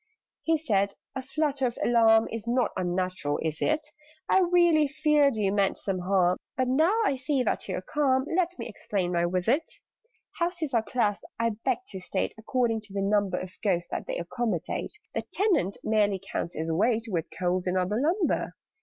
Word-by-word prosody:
He 325 0 +2
said 200 -9 0 0.2
"A 265 - -3
flutter 275 -1 0
of 240 - -5
alarm 225 -2 +5
Is 225 0 -5
not 240 -1 +1
unnatural, 180 -4 -1
is 155 -1 -2
it? 310 0 +1 0.4
I - - +4
really 345 -4 +4
feared 295 -2 +3
you 200 -2 +1
meant 200 -2 +2
some 195 -2 -2
harm: 180 -1 +2 0.2
But, 255 -1 +1
now 320 - +3
I 280 - +2
see 260 0 0
that 220 - -1
you 185 - -2
are - - -4
calm, 265 +1 +1
Let 360 0 +1
me - - -5
explain 195 -4 -2
my 170 -1 +1
visit. 205 - 0 0.7
"Houses 340 -4 -1
are 230 - +4
classed, 210 -1 -1 0.2
I 230 0 +2
beg 225 - -2
to 190 - -6
state, 185 +1 -2
According 225 -1 0
to 200 - -14
the 200 - -1
number 200 -2 +1
Of 185 0 -7
Ghosts 175 -4 0
that - - -4
they - - -2
accommodate: 210 - -3 0.2
(The - - -1
Tenant 360 - +1
merely 205 -3 +2
counts 170 - -3
as 160 +1 -2
weight, 225 +7 +1
With 170 -7 -2
Coals 180 0 0
and 180 +1 +1
other 195 +6 0
lumber). 340 +5 0
225 Hz, 185 wpm, -27 LUFS, 185-280 Hz, 0.7 s, alarm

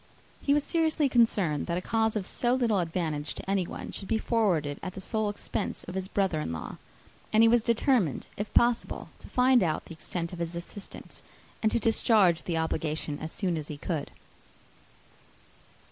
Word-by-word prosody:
He 280 - +3
was 295 - +2
seriously 320 -3 +2
concerned 205 - +2
that 170 - -1
a - - +1
cause 220 +3 +1
of 205 -3 -1
so 240 +5 +1
little 230 -6 +2
advantage 165 -3 -2
to - - -8
anyone 195 -2 -2
should 195 - -6
be 225 - +1
forwarded 180 -12 +1
at 185 - -5
the - - -6
sole 215 +2 -1
expense 205 - -3
of 180 - -8
his 190 0 -3
brother 190 -6 0
in 80 - -3
law; 80 - -6 0.5
and 220 +1 +5
he - - +7
was 235 +1 +5
determined, 230 - +2
if 205 +1 -4
possible, 240 0 +2
to - - -11
find 255 -1 +4
out 160 -3 0
the - - -9
extent 170 +2 -4
of 175 - -7
his 170 0 -3
assistance, 175 +4 -9 0.4
and 220 - +2
to - - +2
discharge 210 -8 +3
the 170 -2 -1
obligation 155 -2 -2
as 160 - -5
soon 180 -5 -1
as 155 -1 -5
he 150 - -6
could. 155 0 -3
190 Hz, 185 wpm, -28 LUFS, 165-225 Hz, 0.5 s, he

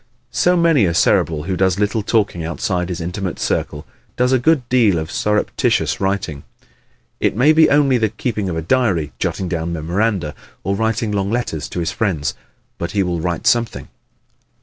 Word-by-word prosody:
So, 180 0 +2
many 165 - +4
a 85 -2 0
Cerebral 80 -1 +2
who 95 +3 -2
does 95 0 +1
little 105 +2 0
talking 100 -5 0
outside 90 +1 -2
his 90 -1 -4
intimate 90 +2 -4
circle 75 - -2 0.3
does 125 +1 +2
a 130 - +4
good 135 -1 +2
deal 115 -8 +3
of 80 0 -4
surreptitious 105 0 0
writing. 95 -7 -2 0.8
It - - +1
may 135 +7 +5
be 160 0 +5
only 140 -3 +3
the 110 -1 +1
keeping 110 -2 -3
of 80 - -3
a 80 - -3
diary, 95 - +1
jotting 95 - -2
down 85 -1 -2
memoranda 85 0 -1 0.3
or 100 - 0
writing 110 +1 -1
long 100 -1 -1
letters 115 -10 -2
to - - -4
his 85 - -1
friends, 85 -10 -1 0.5
but 85 +1 -4
he 100 -2 +2
will 85 -2 -2
write 85 -1 -2
something. 120 -2 +1
100 Hz, 175 wpm, -19 LUFS, 85-115 Hz, 0.8 s, may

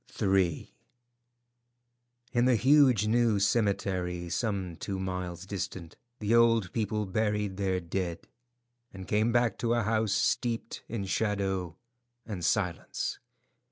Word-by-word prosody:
III. 95 -4 +1 1.6
In 120 0 +2
the 125 -1 +4
huge 130 -2 +5
new 115 -1 +3
cemetery, 95 -4 0
some 95 -2 -2
two 100 -2 -4
miles 90 -1 -4
distant, 95 -4 -5 0.2
the 105 0 0
old 115 -5 +4
people 105 -1 -1
buried 105 -1 -1
their 95 -2 0
dead, 85 -1 -4 0.6
and 95 -1 -9
came 110 +2 +2
back 120 -3 +1
to 120 0 +1
a 120 - +1
house 110 -1 +1
steeped 115 +2 -1
in 110 -4 -3
shadow 95 -4 -1 0.5
and 100 -6 -5
silence. 90 -1 -1
100 Hz, 120 wpm, -29 LUFS, 95-115 Hz, 1.6 s, huge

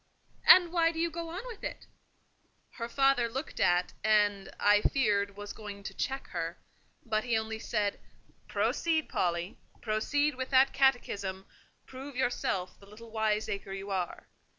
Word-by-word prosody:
"And 355 -2 +9
why 330 -1 +3
do 330 - -10
you 335 0 0
go 335 0 -5
on 370 +8 -6
with 470 -4 -9
it?" - - -5 0.9
Her 230 -1 -6
father 270 -2 +3
looked 265 +6 -5
at, 175 0 +2
and, 205 -2 +2
I 205 0 +5
feared, 205 -7 +1
was 205 0 -6
going 205 -2 -9
to - - -6
check 270 0 -3
her; - - -4 0.5
but 215 -2 0
he 235 -2 +1
only 220 0 -3
said, 210 -3 -1 0.5
"Proceed, 320 -2 0
Polly, 175 +1 -1 0.2
proceed 285 +7 +1
with 260 0 -5
that 265 0 +5
catechism—prove 255 +2 -2
yourself 220 -7 -1
the 200 - -17
little 220 +2 -13
wiseacre 215 -3 -1
you 195 +1 -6
are. 185 -3 -3
220 Hz, 150 wpm, -30 LUFS, 200-270 Hz, 0.9 s, And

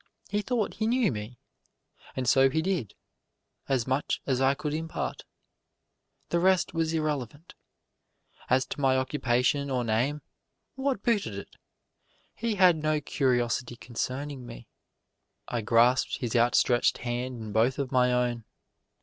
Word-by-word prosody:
He 205 0 0
thought 235 -1 -1
he 220 - -1
knew 240 - +2
me. 110 +2 -6 0.8
And 130 -1 -2
so 135 +2 +5
he 160 +4 0
did 175 - -2 0.7
as 130 -4 +1
much 130 +2 -1
as 130 -2 0
I 135 +1 +4
could 150 +1 -4
impart. 160 +1 -4 1.0
The 170 - +1
rest 185 +1 +2
was 165 -1 0
irrelevant. 150 -1 -3 1.0
As 130 +1 +3
to - - -5
my 130 -1 +3
occupation 130 +1 +1
or 125 -2 0
name, 120 +7 0 0.5
what 265 -5 -2
booted 205 - 0
it! 100 - -9 0.8
he 230 -1 -2
had 180 -4 +5
no 155 0 0
curiosity 125 -4 0
concerning 130 +3 -4
me. - - -10 0.8
I 120 - -2
grasped 120 +5 +3
his 125 -4 -3
outstretched 120 +1 +3
hand 125 +1 -3
in 110 -1 -7
both 115 +5 +2
of 135 -2 -3
my 125 -1 +3
own. 120 -1 0
130 Hz, 140 wpm, -28 LUFS, 120-160 Hz, 1.0 s, so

